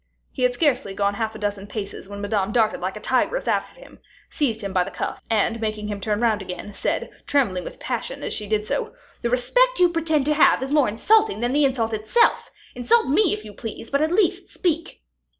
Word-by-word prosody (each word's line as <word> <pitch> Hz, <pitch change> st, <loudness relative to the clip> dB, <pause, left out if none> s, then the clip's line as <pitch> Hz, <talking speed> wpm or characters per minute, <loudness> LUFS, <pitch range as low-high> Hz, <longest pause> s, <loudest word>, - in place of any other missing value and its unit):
He 260 Hz, -, -7 dB
had 250 Hz, 0 st, +2 dB
scarcely 250 Hz, -9 st, +1 dB
gone 200 Hz, 0 st, +1 dB
half 220 Hz, +1 st, -3 dB
a -, -, -5 dB
dozen 205 Hz, -1 st, -3 dB
paces 200 Hz, -2 st, -6 dB
when 200 Hz, 0 st, -7 dB
Madame 205 Hz, -1 st, -1 dB
darted 220 Hz, -1 st, +1 dB
like 185 Hz, +1 st, -3 dB
a -, -, -7 dB
tigress 260 Hz, -, 0 dB
after -, -, -1 dB
him, -, -, -15 dB, 0.3 s
seized 235 Hz, -7 st, 0 dB
him 200 Hz, -2 st, -4 dB
by 185 Hz, -2 st, +3 dB
the -, -, -6 dB
cuff, -, -, -4 dB
and 225 Hz, +1 st, +1 dB
making 215 Hz, -1 st, -3 dB
him 205 Hz, -1 st, -4 dB
turn 210 Hz, +2 st, -1 dB
round 220 Hz, -3 st, +2 dB
again, 185 Hz, +2 st, -7 dB
said, -, -, -2 dB, 0.2 s
trembling 205 Hz, -11 st, +1 dB
with -, -, -9 dB
passion -, -, -4 dB
as -, -, -3 dB
she 210 Hz, -, -5 dB
did 210 Hz, 0 st, 0 dB
so, 455 Hz, -, -3 dB, 0.3 s
"The 235 Hz, -, 0 dB
respect -, -, +2 dB
you 360 Hz, -1 st, +5 dB
pretend 320 Hz, -4 st, 0 dB
to 300 Hz, -, +2 dB
have 295 Hz, -3 st, +4 dB
is 270 Hz, -, -4 dB
more 290 Hz, -6 st, +4 dB
insulting 430 Hz, -, +3 dB
than 240 Hz, +2 st, 0 dB
the 290 Hz, 0 st, +4 dB
insult 235 Hz, -4 st, 0 dB
itself. 220 Hz, -, +2 dB, 0.2 s
Insult 450 Hz, -, +2 dB
me, 350 Hz, +6 st, +3 dB
if 215 Hz, +1 st, -3 dB
you 210 Hz, -, -10 dB
please, 225 Hz, +1 st, -8 dB
but 280 Hz, +1 st, +2 dB
at 315 Hz, +1 st, +1 dB
least 370 Hz, -1 st, +1 dB
speak." 335 Hz, -, -2 dB
235 Hz, 220 wpm, -23 LUFS, 210-305 Hz, 0.3 s, you